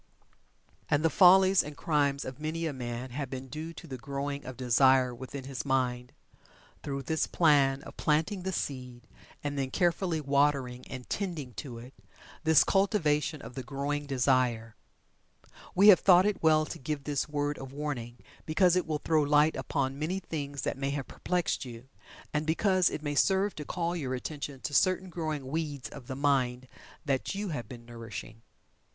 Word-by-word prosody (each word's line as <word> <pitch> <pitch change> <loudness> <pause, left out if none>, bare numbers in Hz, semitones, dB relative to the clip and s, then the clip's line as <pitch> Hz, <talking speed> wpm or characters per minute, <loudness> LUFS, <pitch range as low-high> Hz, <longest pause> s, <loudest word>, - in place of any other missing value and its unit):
And 150 +2 +2
the 165 - +3
follies 190 0 +7
and 150 -1 -8
crimes 140 -3 +1
of 130 +2 -7
many 160 +2 -3
a 155 - -2
man 120 0 -5
have 140 +1 -4
been 130 0 -6
due 155 +3 -6
to 155 - -11
the 130 -5 -7
growing 140 +2 -4
of 130 -2 -7
desire 130 +1 +4
within 130 +3 -7
his 135 -1 -5
mind, 125 -2 0 0.7
through 140 -1 -4
this 160 +2 0
plan 140 -4 +3
of - - -12
planting 160 +6 +1
the 190 +1 -3
seed, 125 -7 -5 0.4
and 145 -1 -2
then 135 -1 -1
carefully 175 +2 +1
watering 140 -3 +1
and 125 -1 -8
tending 165 -11 -4
to 125 -1 -7
it 125 +3 -11 0.5
this 160 -2 +6
cultivation 155 -7 +1
of - - -9
the 130 - -5
growing 140 +2 -3
desire. 125 -4 +1 1.0
We 200 +3 +7
have 190 - +9
thought 180 -1 +6
it 210 -1 0
well 155 -1 +4
to - - -7
give 145 +1 -4
this 145 +1 -2
word 145 0 -1
of 135 -1 -8
warning 135 -5 -4 0.3
because 175 +3 +4
it 180 - 0
will 155 -1 0
throw 160 -2 +3
light 150 +2 +4
upon 135 -1 -2
many 165 +5 -1
things 145 -6 -5
that - - -2
may 135 0 -1
have 140 -1 -3
perplexed 180 -2 -1
you, 125 0 -10 0.4
and 150 +1 -1
because 185 +2 +3
it 150 - -5
may 145 -1 -2
serve 190 +6 +2
to 150 - -7
call 170 +1 -2
your 130 -6 -2
attention 140 0 -6
to 145 - -4
certain 185 +4 +2
growing 155 -5 -3
weeds 145 -1 -3
of 135 -4 -11
the 130 - -4
mind 130 -3 +1 0.4
that 140 +6 -1
you 200 0 -3
have 135 -8 -5
been 120 -2 -10
nourishing. 115 -1 -8
145 Hz, 180 wpm, -30 LUFS, 130-160 Hz, 1.0 s, have